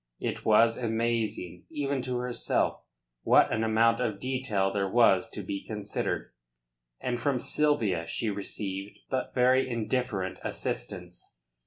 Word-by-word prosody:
It - - -3
was 115 +2 +5
amazing 115 -6 -1
even 140 -3 -1
to 125 0 -2
herself 125 0 0 0.4
what - - +5
an 110 - +1
amount 115 +2 +3
of 110 -5 -1
detail 120 -7 0
there 100 -1 0
was 95 -4 +4
to 105 - -6
be 100 +1 -4
considered, 105 -2 -3 0.7
and 120 -1 -2
from 140 -3 +1
Sylvia 115 - +1
she 110 +5 -1
received 100 0 -5
but 130 - -2
very 130 +1 +4
indifferent 115 -4 -1
assistance. 90 -2 -5
115 Hz, 130 wpm, -29 LUFS, 100-125 Hz, 0.7 s, was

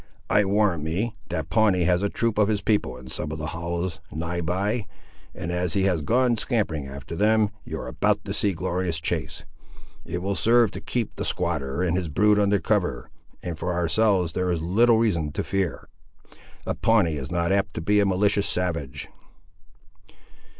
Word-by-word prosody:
I 105 - +4
warrant 100 -4 +2
me, 95 +9 -2
that 80 -4 -4
Pawnee 105 -4 +3
has 90 +1 +2
a 100 - +1
troop 115 -1 -1
of 105 - +4
his 105 -2 0
people 100 - 0
in 65 0 -11
some 75 +3 -3
of 80 - -4
the 75 - -4
hollows, 85 0 -3
nigh 85 +2 -3
by; 100 +6 -1 0.5
and 85 - -4
as 90 -2 0
he 95 - +1
has 90 -5 +2
gone 120 - +2
scampering 95 - -1
after 70 +3 -7
them, 105 +2 +3
you - - -5
are - - -6
about - - 0
to - - -3
see 105 - +1
a - - -1
glorious 90 -1 -2
chase. 80 - -3 0.6
It 85 +1 -4
will 100 +1 0
serve 115 +4 +4
to - - -7
keep 120 -4 -3
the - - -2
squatter 75 -2 -1
and 85 -2 +1
his 90 -4 -2
brood 105 +7 +3
under 100 0 +3
cover, - - -1 0.3
and 85 -3 -5
for 90 0 -2
ourselves 90 0 +2
there 90 0 0
is 85 -2 -1
little 115 +7 +4
reason 85 -10 +1
to - - -2
fear. 95 -3 -2 0.8
A - - -1
Pawnee 100 -9 +2
is 65 -2 -5
not 85 0 0
apt 100 -3 0
to - - -3
be 105 +5 +3
a 100 - +4
malicious 100 +2 +2
savage." 85 -8 -2
90 Hz, 190 wpm, -25 LUFS, 80-105 Hz, 0.8 s, I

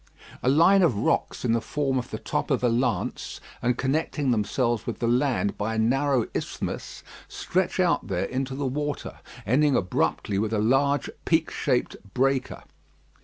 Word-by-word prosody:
A 125 - +2
line 170 +8 +5
of 165 - +3
rocks 110 - 0
in 120 - +2
the 115 - +1
form 135 0 -1
of 125 - -6
the - - -4
top - - -3
of - - +1
a 120 - +4
lance, 120 +1 -1 0.2
and 125 0 +1
connecting 140 0 0
themselves 115 +1 0
with - - -3
the 120 - -2
land 125 -3 +1
by 110 +2 -1
a - - -2
narrow 130 +2 +2
isthmus, - - -5 0.2
stretch 185 0 -1
out 180 -2 +2
there 95 -3 -1
into 130 +1 -3
the 140 +1 -3
water, 145 +2 -3 0.3
ending 135 +6 +3
abruptly 95 +2 0
with 110 +1 -1
a - - +1
large 135 +6 +2 0.2
peak - - +2
shaped - - 0 0.2
breaker. 135 0 0
130 Hz, 170 wpm, -26 LUFS, 115-145 Hz, 0.3 s, line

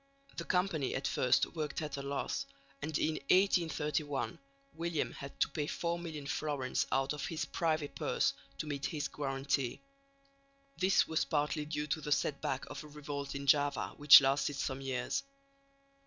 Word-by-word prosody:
The 170 - -3
Company 180 -7 0
at 135 +1 -1
first 125 +1 +3
worked 155 -3 -2
at 150 - -4
a 140 - -4
loss, 140 0 -2 0.3
and 150 +1 -1
in 155 0 0
1831 160 -6 +2 0.3
William 165 -1 -1
had 140 0 -9
to - - +5
pay 145 +1 -2
four 170 +1 -2
million 160 -4 -6
florins 145 -3 -1
out 135 +2 +1
of 150 - -4
his 165 -1 -2
privy 155 -3 0
purse - - 0 0.2
to - - -3
meet 145 -2 -2
his 150 -2 -2
guarantee. 135 -2 -1 1.0
This 190 +1 +3
was 160 - +1
partly 150 0 0
due 150 0 -2
to 150 +1 -2
the 150 - -5
set 145 0 +1
back 135 0 -2
of - - -6
a - - -10
revolt 145 -1 -5
in 140 0 -4
Java 145 0 +2
which 145 -1 +10
lasted 140 +1 +1
some 135 -1 -2
years. 125 -2 -1
145 Hz, 165 wpm, -33 LUFS, 140-155 Hz, 1.0 s, which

